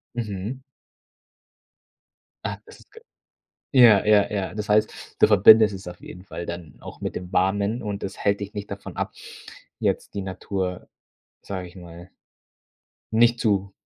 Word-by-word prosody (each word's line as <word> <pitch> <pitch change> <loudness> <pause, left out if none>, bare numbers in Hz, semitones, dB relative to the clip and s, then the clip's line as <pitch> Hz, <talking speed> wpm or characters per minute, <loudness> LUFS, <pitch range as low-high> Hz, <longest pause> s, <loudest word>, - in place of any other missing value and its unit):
Mhm. 110 +2 -4 1.8
Ah, - - -3
das - - -15
ist - - -23
g. 455 - -14 0.7
Ja, 120 -7 +7
ja, 105 -1 +4
ja. 100 -3 -2
Das 105 -1 -5
heißt, 105 +1 0
du - - +6
verbindest 105 +1 +7
es 95 -1 -9
auf 90 0 -9
jeden 90 - -11
Fall 85 - -7
dann 85 -2 -8
auch - - -10
mit - - -4
dem 90 0 -6
Warmen 100 +5 +1
und 105 -1 -5
das 95 - -5
hält 100 0 +1
dich 100 +1 -6
nicht 105 -1 -6
davon 100 0 -8
ab, - - -3 0.7
jetzt - - -1
die 100 - -3
Natur 95 -1 -4 0.5
sage 95 -2 -6
ich 90 - -17
mal 85 0 -12 1.0
nicht 120 +1 +4
zu 100 -2 0
100 Hz, 155 wpm, -24 LUFS, 95-105 Hz, 1.8 s, Ja